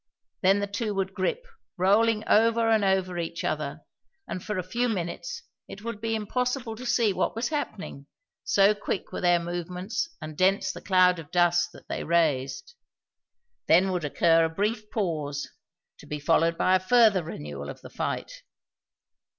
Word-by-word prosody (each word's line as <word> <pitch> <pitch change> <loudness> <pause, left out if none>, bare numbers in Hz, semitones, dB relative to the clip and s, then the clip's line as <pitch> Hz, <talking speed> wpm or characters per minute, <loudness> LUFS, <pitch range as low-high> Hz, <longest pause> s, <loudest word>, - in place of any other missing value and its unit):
Then 195 +1 +4
the 205 - 0
two 205 +1 -3
would 195 0 -2
grip, 210 - -2 0.3
rolling 215 +4 +3
over 230 +1 +4
and 220 -2 +3
over 190 -2 +1
each 170 0 -4
other, 150 0 -3 0.5
and 185 - -5
for 210 - -3
a 185 - -1
few 240 +7 -1
minutes 210 - -4 0.2
it 205 - -10
would 225 -2 -5
be 225 0 -1
impossible 245 +2 -2
to 250 +2 -6
see 230 -4 +2
what - - -1
was 230 +2 -1
happening, 200 - -5 0.4
so 200 +1 +4
quick 205 -2 -4
were - - -5
their 175 -1 +4
movements 180 - -3
and 155 -1 -8
dense 190 +3 +2
the - - -10
cloud 180 -1 +4
of 155 -3 -10
dust 175 0 +2
that - - -15
they - - -4
raised. 165 - 0 0.9
Then 185 +4 +5
would 180 -3 -2
occur 165 +3 +3
a 165 - +1
brief 210 +5 -2
pause, 150 -8 -2 0.5
to - - -14
be 150 - -4
followed 165 +2 +2
by 185 - +3
a - - +3
further 210 -1 +4
renewal 75 - -7
of - - -9
the - - -12
fight. - - -4
185 Hz, 170 wpm, -27 LUFS, 170-215 Hz, 0.9 s, Then